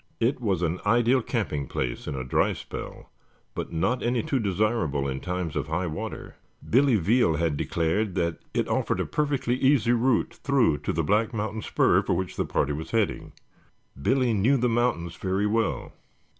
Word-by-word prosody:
It 125 Hz, +3 st, +1 dB
was 95 Hz, -7 st, 0 dB
an 85 Hz, +2 st, -1 dB
ideal 120 Hz, +4 st, +3 dB
camping 95 Hz, -, -2 dB
place -, -, -3 dB
in 75 Hz, -, -3 dB
a 65 Hz, -, -3 dB
dry 65 Hz, -, +1 dB
spell, -, -, -8 dB, 0.4 s
but -, -, -5 dB
not 95 Hz, +10 st, 0 dB
any 120 Hz, -1 st, 0 dB
too 135 Hz, -, 0 dB
desirable 95 Hz, -, 0 dB
in 65 Hz, 0 st, -3 dB
times 90 Hz, -2 st, -3 dB
of -, -, -2 dB
high 85 Hz, +4 st, -1 dB
water. 80 Hz, -3 st, -6 dB, 0.3 s
Billy 130 Hz, +1 st, +4 dB
Veal 105 Hz, -2 st, +3 dB
had 80 Hz, -1 st, 0 dB
declared 90 Hz, +7 st, -1 dB
that 85 Hz, -3 st, -1 dB
it -, -, 0 dB
offered -, -, 0 dB
a -, -, 0 dB
perfectly 140 Hz, -5 st, 0 dB
easy 130 Hz, -3 st, +3 dB
route 120 Hz, 0 st, +2 dB
through 125 Hz, -, +3 dB
to -, -, -2 dB
the 80 Hz, -, -1 dB
Black 110 Hz, -, +1 dB
Mountain 110 Hz, +1 st, -3 dB
spur -, -, +3 dB
for -, -, -1 dB
which 95 Hz, 0 st, -3 dB
the -, -, -1 dB
party 75 Hz, -, 0 dB
was 80 Hz, +3 st, -5 dB
heading. 110 Hz, -3 st, -1 dB, 0.7 s
Billy 130 Hz, -, +2 dB
knew 115 Hz, +7 st, +3 dB
the 125 Hz, 0 st, +1 dB
mountains 115 Hz, -8 st, 0 dB
very 95 Hz, +2 st, -1 dB
well. 110 Hz, +1 st, -1 dB
105 Hz, 180 wpm, -26 LUFS, 85-120 Hz, 0.7 s, Billy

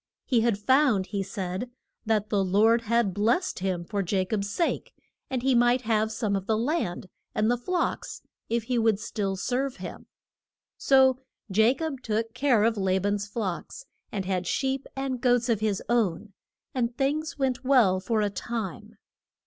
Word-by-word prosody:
He 240 Hz, -3 st, +2 dB
had 230 Hz, -3 st, +2 dB
found, 255 Hz, -3 st, +3 dB
he 200 Hz, 0 st, -3 dB
said, 190 Hz, +3 st, -4 dB, 0.4 s
that 215 Hz, -1 st, +1 dB
the 200 Hz, -2 st, +2 dB
Lord 215 Hz, +5 st, +4 dB
had 230 Hz, -3 st, +2 dB
blest 235 Hz, -, +1 dB
him 185 Hz, -2 st, -2 dB
for 205 Hz, +2 st, -2 dB
Ja 185 Hz, +1 st, 0 dB
cob's 200 Hz, 0 st, -2 dB
sake, 335 Hz, -, -2 dB, 0.3 s
and 255 Hz, -2 st, -2 dB
he 265 Hz, 0 st, +3 dB
might 240 Hz, +1 st, +4 dB
have 220 Hz, -1 st, +1 dB
some 215 Hz, -2 st, -1 dB
of 195 Hz, 0 st, -3 dB
the 220 Hz, -, +2 dB
land 235 Hz, -, -1 dB, 0.3 s
and 215 Hz, +1 st, +2 dB
the -, -, +3 dB
flocks 355 Hz, +8 st, -2 dB, 0.3 s
if 235 Hz, 0 st, 0 dB
he 245 Hz, +1 st, 0 dB
would 220 Hz, -3 st, +2 dB
still 205 Hz, -3 st, -2 dB
serve 255 Hz, +7 st, -1 dB
him. -, -, -9 dB, 0.7 s
So 265 Hz, -1 st, +4 dB, 0.4 s
Ja 220 Hz, +4 st, +5 dB
cob 310 Hz, -5 st, -4 dB
took 225 Hz, 0 st, -2 dB
care 250 Hz, -4 st, +3 dB
of 225 Hz, 0 st, +2 dB
La 190 Hz, -1 st, +1 dB
ban's 205 Hz, +1 st, -1 dB
flocks, 210 Hz, -, -4 dB, 0.3 s
and 195 Hz, -3 st, -3 dB
had 185 Hz, -2 st, -1 dB
sheep 270 Hz, +4 st, -1 dB
and 270 Hz, -2 st, -3 dB
goats 245 Hz, -1 st, +2 dB
of 225 Hz, -3 st, +2 dB
his 210 Hz, -3 st, -1 dB
own, 215 Hz, -4 st, 0 dB, 0.4 s
and 240 Hz, -2 st, -1 dB
things 305 Hz, +4 st, -1 dB
went 265 Hz, -2 st, -1 dB
well 240 Hz, -9 st, +4 dB
for 215 Hz, +3 st, 0 dB
a 205 Hz, -1 st, 0 dB
time. 220 Hz, -3 st, -5 dB
225 Hz, 175 wpm, -27 LUFS, 200-255 Hz, 0.7 s, Ja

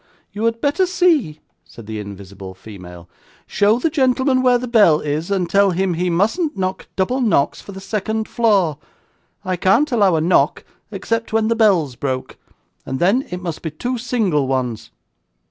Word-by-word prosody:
'You 210 Hz, +2 st, -3 dB
had 230 Hz, 0 st, 0 dB
better 320 Hz, +6 st, +1 dB
see,' 320 Hz, -, +1 dB, 0.2 s
said 90 Hz, +6 st, -14 dB
the 110 Hz, 0 st, -6 dB
invisible 100 Hz, -2 st, -9 dB
female. 90 Hz, -4 st, -12 dB, 0.4 s
'Show 205 Hz, +3 st, +2 dB
the 310 Hz, +6 st, -1 dB
gentleman 260 Hz, -2 st, +2 dB
where 250 Hz, -1 st, +4 dB
the 250 Hz, +1 st, -5 dB
bell 205 Hz, -10 st, +4 dB
is, 150 Hz, +3 st, -3 dB
and 190 Hz, -3 st, 0 dB
tell 200 Hz, +2 st, +3 dB
him 185 Hz, 0 st, 0 dB
he 180 Hz, +2 st, -1 dB
mustn't 225 Hz, -, 0 dB
knock 185 Hz, 0 st, -3 dB
double 245 Hz, +8 st, 0 dB
knocks 205 Hz, -, +1 dB
for -, -, -11 dB
the 190 Hz, -, -9 dB
second 220 Hz, +2 st, -3 dB
floor; 195 Hz, -, +1 dB, 0.7 s
I 185 Hz, -1 st, -1 dB
can't 230 Hz, -, +2 dB
allow 200 Hz, -7 st, +3 dB
a 155 Hz, -, +1 dB
knock 170 Hz, +3 st, +2 dB, 0.3 s
except 230 Hz, -1 st, -3 dB
when 220 Hz, 0 st, +2 dB
the 230 Hz, -, +2 dB
bell's 185 Hz, -, +2 dB
broke, 130 Hz, 0 st, -4 dB, 0.5 s
and 130 Hz, -, -4 dB
then 200 Hz, -, +1 dB
it 180 Hz, +1 st, -6 dB
must 170 Hz, -3 st, -5 dB
be 160 Hz, -, -4 dB
two 245 Hz, -, -4 dB
single 215 Hz, -, 0 dB
ones. 125 Hz, -4 st, -3 dB
190 Hz, 175 wpm, -19 LUFS, 150-235 Hz, 0.7 s, where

